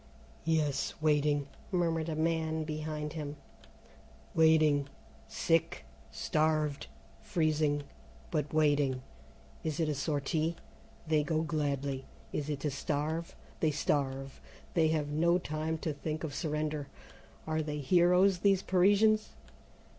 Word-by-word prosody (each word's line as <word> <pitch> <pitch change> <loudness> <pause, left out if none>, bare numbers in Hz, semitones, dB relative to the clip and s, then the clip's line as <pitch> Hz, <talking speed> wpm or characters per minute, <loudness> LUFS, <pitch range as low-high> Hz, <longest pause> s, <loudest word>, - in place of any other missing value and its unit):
"Yes, 155 -4 +1
waiting," 150 -2 +2 0.3
murmured 165 -3 0
a 155 - -2
man 160 0 0
behind 155 -1 -4
him, 150 -2 -5 1.0
"waiting, 155 -3 +4 0.4
sick, 165 +1 0 0.2
starved, 155 -2 0 0.3
freezing, 155 -2 +1 0.5
but 150 -3 -1
waiting. 145 -4 +2 0.6
Is 155 -1 -2
it 160 - +2
a 150 - +1
sortie? 155 +3 -1 0.5
They 155 -1 +3
go 155 +1 0
gladly. 140 -3 -2 0.3
Is 150 0 -2
it 145 -2 -3
to 150 - -1
starve? 155 +4 -2 0.2
They 160 - +3
starve. 135 -2 -1 0.3
They 165 -3 +4
have 155 -2 0
no 170 +4 +3
time 160 -1 -2
to 155 - 0
think 155 +2 -4
of 155 -3 -3
surrender. 150 -2 -2 0.6
Are 155 0 0
they 150 -1 -3
heroes, 180 +5 +4
these 195 0 +3
Parisians? 205 +4 +3
155 Hz, 115 wpm, -32 LUFS, 145-160 Hz, 1.0 s, waiting